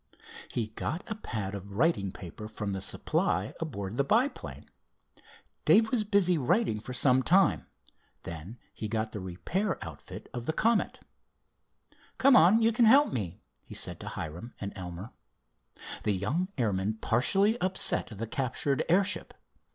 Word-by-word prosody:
He 115 -3 -2
got 150 +9 -4
a - - +2
pad 110 - -5
of 100 0 -7
writing 110 - +2
paper 100 +3 -9
from 105 -2 -4
the 95 - -3
supply 95 +1 0
aboard 110 -9 -4
the 140 - +3
biplane. 235 - 0 1.0
Dave 220 +1 +5
was 240 -4 +2
busy 200 -5 +3
writing 170 - +1
for 120 - -8
some 125 +1 +3
time. 185 +7 +3 0.6
Then 85 +8 -8 0.2
he 110 - -5
got 110 0 -2
the 105 - -5
repair 165 - -2
outfit - - -9
of 120 -1 -5
the 160 - +1
Comet. 225 +5 +1 1.2
"Come 275 0 +6
on, 215 +4 +6
you 225 - +5
can 235 +1 +4
help 275 +6 +6
me," 95 - -4 0.2
he - - -10
said - - 0
to - - -8
Hiram 85 +10 -6
and 100 -1 -5
Elmer. 90 +3 -7 0.9
The 105 - +1
young 125 - -1
airman 105 -3 0
partially 195 - +2
upset 185 +1 +2
the 110 0 -5
captured 130 +3 -1
airship. 195 +3 +1
125 Hz, 150 wpm, -29 LUFS, -, 1.2 s, Come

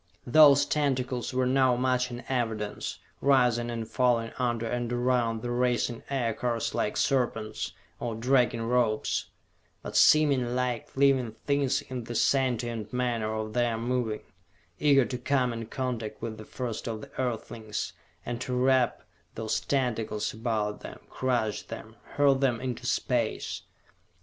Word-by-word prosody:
Those 140 +1 +7
tentacles 130 -4 -1
were 130 0 +1
now 130 -1 +3
much 125 0 +1
in 120 0 -7
evidence, 110 -5 -2 0.2
rising 125 -3 +3
and 115 -2 -4
falling 120 -2 +1
under 120 -2 0
and 120 +1 -2
around 120 -2 +1
the 120 - -2
racing 120 -1 0
Aircars 120 -3 -1
like 105 - -1
serpents, 115 -5 0 0.3
or 115 -2 -3
dragging 120 0 +2
ropes; 115 -2 +1 0.6
but - - -7
seeming 140 -6 +5
like 125 -1 -2
living 135 -5 +3
things 140 -1 +1
in 125 -4 -6
the 120 - -6
sentient 120 -4 +1
manner 120 -3 -1
of 110 0 -4
their 120 -2 +1
moving 115 -2 -1 0.6
eager 140 -3 +5
to 125 - -4
come 125 -1 +1
in 115 -1 -5
contact 120 -4 -3
with 110 -2 -5
the 110 - -9
first 120 -2 -5
of 110 -2 -4
the - - -11
earthlings, 115 -3 -3 0.3
and 120 0 -4
to 125 -1 -2
wrap 130 -1 +2 0.3
those 110 0 -1
tentacles 115 -6 -1
about 110 -2 -2
them, - - -9
crush 120 -5 0
them, 110 0 -9 0.2
hurl 145 -1 +5
them 130 -3 +1
into 125 -2 -4
space. - - -1
120 Hz, 140 wpm, -28 LUFS, 115-130 Hz, 0.6 s, Those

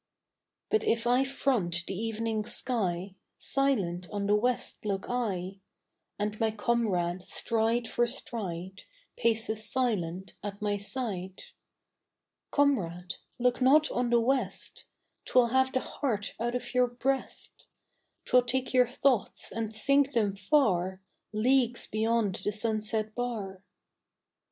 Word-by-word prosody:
But 435 - +3
if 230 0 +1
I 250 +2 +4
front 215 -11 0
the - - -4
evening 225 +1 -2
sky 200 -6 0 0.2
Silent 195 -11 0
on 205 -1 -3
the 205 - +2
west 240 +4 0
look 200 -2 -2
I, 195 -6 -2 0.6
And 210 +1 -3
my 225 - +2
comrade, 205 -6 0
stride 230 +3 0
for 240 - +1
stride, 190 -6 -4 0.3
Paces 220 -1 +2
silent 190 -8 -1
at 205 0 -6
my 210 -1 0
side, 200 -4 -3 1.1
Comrade, 180 - 0 0.2
look 250 +1 +1
not 295 +4 +5
on 245 0 0
the 240 0 +4
west: 260 +3 -2 0.4
'Twill 245 -2 +4
have 260 +1 +2
the 260 - 0
heart 225 -8 -3
out 240 +2 -1
of 250 - -4
your 250 0 +4
breast; 260 +2 -3 0.6
'Twill 250 - +5
take 255 +2 -1
your 250 -1 +5
thoughts 255 -2 0
and 225 -1 -3
sink 275 +5 +3
them 210 -4 +1
far, 190 - +2 0.3
Leagues 240 +2 +2
beyond 220 -2 0
the 210 - 0
sunset 215 0 -1
bar. 215 -6 -4
225 Hz, 125 wpm, -29 LUFS, 200-250 Hz, 1.1 s, not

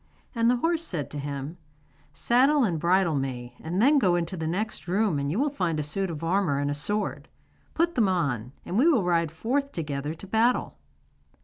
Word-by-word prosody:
And 230 -1 +2
the 250 - +4
horse 330 +6 0
said 160 - -4
to 145 - -5
him: 140 +3 -5 0.5
'Saddle 270 +4 +3
and 175 -8 0
bridle 175 +1 +2
me, 125 -3 -3
and 175 +4 -3
then 280 +6 +5
go 185 -8 +3
into 175 +1 -2
the 160 -2 -3
next 180 -2 -3
room 190 -4 +1
and 140 0 -2
you 165 - -1
will 285 +3 +1
find 175 - -1
a - - -1
suit 190 +6 -2
of 165 -1 -6
armour 170 -4 +1
and 145 0 0
a - - 0
sword. 205 +9 -3 0.5
Put 340 +1 +1
them 225 -8 +2
on, 135 -10 -1
and 190 - -1
we 290 - +5
will 270 - +4
ride 170 -2 +1
forth 270 - -1
together 150 -1 -4
to 165 - -11
battle. 225 +5 +1
175 Hz, 205 wpm, -26 LUFS, 150-230 Hz, 0.5 s, then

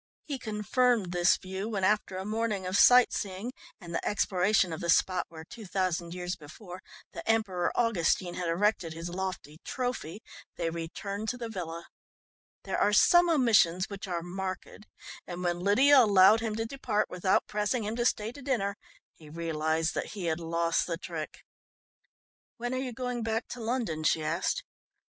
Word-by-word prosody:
He 280 -3 -4
confirmed 220 -1 +1
this 175 0 +3
view 190 +3 -5
when 200 -4 -2
after 200 -1 +1
a 190 - -5
morning 215 -2 -2
of 185 +1 -2
sight 250 +3 +7
seeing 200 +4 -4 0.3
and 170 -4 -9
the - - -2
exploration 190 -2 +2
of 160 - -6
the 170 - -3
spot 185 +2 +2
where, 160 -1 -10
two 215 +5 -11
thousand 180 -2 -1
years 180 0 -3
before, 175 +5 -11 0.3
the - - -6
Emperor 205 -6 +1
Augustine 185 -6 +1
had 175 -1 -3
erected 180 -1 +1
his 165 +2 -6
lofty 180 -5 -5
"trophy," 245 -7 -4 0.3
they 165 -1 -2
returned 200 +6 -5
to 250 - -3
the 235 -2 -5
villa. 170 -5 -6 0.8
There - - -2
are 205 - +3
some 345 +11 +6
omissions 220 - +3
which 200 0 -6
are 170 -2 -3
marked, 185 +3 -6 0.4
and 180 0 -6
when 175 -1 0
Lydia 260 +10 +5
allowed 205 0 +6
him 225 -2 -3
to 225 +1 -2
depart 230 -4 -1
without 180 +1 +1
pressing 210 +3 -1
him 215 +2 -3
to 240 - 0
stay 215 -1 -1
to 285 - -12
dinner 215 -7 -1 0.4
he 155 -2 -15
realised 160 0 -1
that - - -4
he 195 -4 -5
had 160 0 0
lost 170 0 0
the 170 -2 -2
trick. 165 -3 -7 1.1
"When 245 +1 -3
are - - -1
you 260 -2 -4
going 250 0 -4
back 225 0 -2
to 250 - -7
London?" 225 -9 -2
she 155 0 +2
asked. 165 +4 -1
190 Hz, 175 wpm, -29 LUFS, 170-225 Hz, 1.1 s, sight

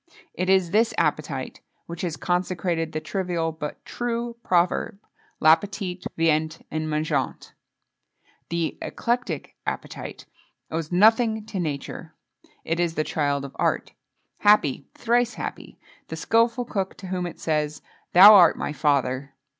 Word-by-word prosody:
It 185 - -2
is 190 -3 +3
this 225 +2 +2
appetite 150 -4 -1 0.2
which 170 0 -7
has 170 -4 -3
consecrated 175 -1 -1
the 155 - -2
trivial 170 0 -2
but 155 -2 -7
true 235 0 -3
proverb: 180 +3 +1 0.4
"L'appétit 180 +3 +2
vient 160 0 +1
en 155 0 -2
mangeant." 155 0 -2 1.0
The 170 -1 -2
eclectic 245 +1 -3
appetite - - -5 0.5
owes 160 0 -3
nothing 220 +3 +4
to 205 -3 -5
nature; 150 -5 -5 0.5
it 165 +1 -1
is 170 -2 0
the 155 - +1
child 145 -2 -1
of 135 - -10
art. - - 0 0.5
Happy, 150 -10 +3
thrice 240 +1 +1
happy, - - -7 0.3
the - - -5
skilful 230 +2 +1
cook 195 -5 -3
to 190 - -9
whom 180 -1 -2
it 175 - -10
says: 150 -2 -1 0.3
"Thou 195 +4 +11
art 180 -5 +7
my - - -3
father!" 140 -1 0
170 Hz, 130 wpm, -24 LUFS, 155-200 Hz, 1.0 s, Thou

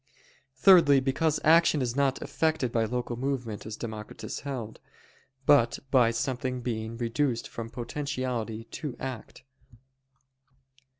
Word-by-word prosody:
Thirdly, 145 -2 +7
because 145 +4 0
action 165 -1 +5
is 125 -2 -1
not 140 -1 +1
effected 155 -6 0
by 115 -1 +1
local 120 +1 -3
movement, 120 -5 -3
as 110 - -6
Democritus 110 -2 -6
held: 125 -6 -6 0.7
but 140 -6 +4
by 125 -4 +5
something 125 +2 -2
being 115 -1 -4
reduced 120 +1 -1
from 115 -1 -7
potentiality 125 -3 -4
to 140 -6 -5
act. 130 -4 -7
125 Hz, 115 wpm, -28 LUFS, 115-140 Hz, 0.7 s, Thirdly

